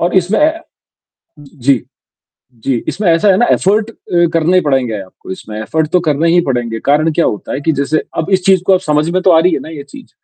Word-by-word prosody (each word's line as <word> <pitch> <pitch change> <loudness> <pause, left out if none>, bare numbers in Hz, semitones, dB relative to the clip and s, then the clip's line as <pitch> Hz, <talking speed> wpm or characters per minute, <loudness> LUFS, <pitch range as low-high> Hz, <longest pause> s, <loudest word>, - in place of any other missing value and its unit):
और 175 +2 0
इसमें 185 +3 +2
ए 305 +1 +4 0.9
जी। 135 -3 -1 0.8
जी, 135 - 0
इसमें 205 -1 -2
ऐसा 165 +5 +2
है 190 - +4
ना 240 - +3
एफर्ट 210 +3 +1
अ, - - -24 0.4
करने 165 +2 +2
ही - - +4
पड़ेंगे 130 -7 0
आपको 95 0 -12
इसमें 105 +3 -8
एफर्ट 160 +8 -1
तो 180 - +3
करने 155 +3 +1
ही 175 +1 +4
पड़ेंगे, 120 -3 -2
कारण 155 +3 +2
क्या 165 +2 +1
होता 105 - -3
है 140 - -3
कि 160 - +1
जैसे 155 +2 0 0.2
अब 160 - -2
इस 185 - -13
चीज़ 190 -2 +3
को 195 - +5
आप 185 - +3
समझ 150 -1 0
में 185 +2 0
तो 185 - +4
आ 160 - +5
रही 180 +3 +2
है - - 0
ना - - -10
ये 150 -3 -8
चीज़? 275 -3 -13
160 Hz, 240 wpm, -14 LUFS, 140-185 Hz, 0.9 s, को